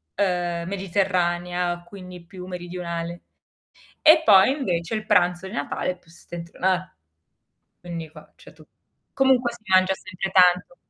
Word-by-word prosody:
ehm, 175 -3 -1
mediterranea, 180 -2 -1
quindi 180 -2 -12
più 180 +1 -10
meridionale. 175 -1 -6 0.8
E 315 0 +7
poi 195 +1 +7
invece 180 - -2
il 215 0 -4
pranzo 180 -3 +2
di - - -11
Natale 145 +5 -2
è 180 - -6
più 165 - -24
settentriona 175 +2 -3 0.9
quindi 170 -2 -7
qua 155 -1 -16
c'è - - -16
tu - - -18 0.5
comunque 260 -3 +2
si 235 -2 -14
mangia 185 0 +4
sempre 185 +1 -6
tanto. 180 -1 +4
180 Hz, 130 wpm, -23 LUFS, 175-195 Hz, 0.9 s, E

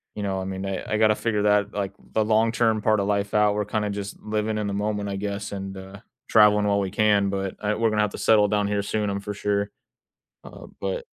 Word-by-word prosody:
you 105 - -4
know, 95 -1 -2
I - - -4
mean, 95 0 -4
I 95 -1 -3
I - - +2
gotta 110 -1 +4
figure 105 -2 -1
that 105 -1 +2
like, 100 -1 -3 0.2
the 110 - +2
long 110 +1 +3
term 110 -2 +1
part 110 -1 +2
of 100 - -1
life 100 0 -1
out. 105 -1 +4
We're 105 - -1
kinda 105 0 -2
just 100 0 -5
living 110 0 -2
in 105 -1 -2
the 100 - -3
moment, 105 0 -2
I 100 - -3
guess, 100 0 -4
and, 95 -1 -6
uh, 95 +1 -10 0.3
traveling 105 -1 +5
while 100 0 +2
we 95 -2 -2
can, 105 -2 +3
but 95 -1 -3
uh, 105 0 -1
we're 115 0 +2
gonna 105 -1 +1
have 105 -1 0
to - - -7
settle 105 -2 +4
down 105 0 0
here 100 0 0
soon, 105 0 -2
I'm 100 0 -2
for 105 +1 -5
sure, 100 0 -1 0.8
uh, - - -11
but 95 -1 -3
105 Hz, 250 wpm, -24 LUFS, 100-105 Hz, 0.8 s, traveling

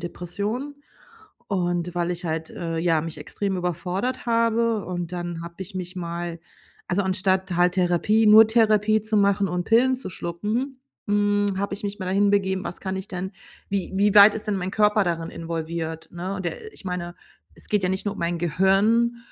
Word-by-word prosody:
Depressionen 205 +11 -4 0.7
und 175 -3 -1
weil 175 0 0
ich 175 +1 -4
halt, 160 -1 -3
äh, 165 -1 -4
ja, 165 -1 +2
mich 165 -1 -6
extrem 190 +6 -3
überfordert 180 +8 -2
habe 230 -2 +2
und 175 -1 -4
dann 175 -2 -4
habe 170 0 -9
ich 190 +1 -7
mich 185 0 -5
mal 170 -1 -4 0.5
also, 190 +2 +1
anstatt 190 -1 0
halt 180 0 +4
Therapie 185 +5 +2
nur 215 +1 +9
Therapie 215 -1 +3
zu 220 0 -1
machen 200 -1 +3
und 180 0 -2
Pillen 250 +5 +4
zu 255 - -7
schlucken, 215 +11 -3 0.3
hm, 205 -1 +2
habe 200 +1 -2
ich 200 - -9
mich 205 +1 -3
mal 190 - -5
dahin 200 +2 +2
begeben, 190 -2 +1
was 175 - -5
kann 190 -1 -3
ich 190 +2 -6
denn 185 +1 -4 0.4
wie 195 -2 -2
wie 205 +1 +3
weit 205 0 +9
ist 220 - -5
denn 205 - +1
mein 185 0 -3
Körper 210 0 +3
darin 165 -2 -2
involviert, 165 -1 -4
ne, 180 +3 -4
und 190 - -6
der 175 - -4
äh, 435 - -9
ich - - -11
meine, 175 -2 -4 0.4
es - - -13
geht 210 -2 +1
ja 180 - +2
nicht 190 0 -2
nur 205 - 0
um - - -11
mein 170 +1 0
Gehirn, 195 +8 +2
190 Hz, 195 wpm, -24 LUFS, 175-210 Hz, 0.7 s, nur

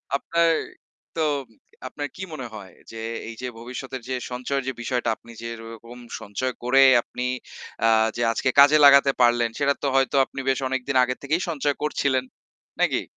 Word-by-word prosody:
আপনার 170 +4 +1 0.7
তো 165 - -1 0.7
আপনার 145 +3 -5
কি - - -9
মনে 130 -5 -6
হয় 95 -3 -10 0.2
যে 115 - -9 0.3
এইযে 115 +2 -7
ভবিষ্যতের 125 +2 -7
যে 130 - -1 0.2
সঞ্চয়ের 130 +2 -2
যে 130 - -1
বিষয়টা 120 -1 -1
আপনি 115 - -16
যেরকম 115 0 -9 0.2
সঞ্চয় 125 +6 -3
করে 130 +2 +4 0.2
আপনি 125 - -7 0.6
আ - - +5 0.3
যে - - -3
আজকে 120 +3 0
কাজে 145 +2 +8
লাগাতে 140 0 +7
পারলেন 120 -1 +4
সেটা 140 -1 +3
তো - - 0
হয়তো 135 +1 +2
আপনি 135 - -9
বেশ 135 - +1
অনেকদিন 130 +1 -2
আগে 125 0 -1
থেকেই 155 +5 0
সঞ্চয় 145 -3 -1
করছিলেন। 140 -3 0 0.6
নাকি? - - +1
130 Hz, 160 wpm, -24 LUFS, 120-140 Hz, 0.7 s, কাজে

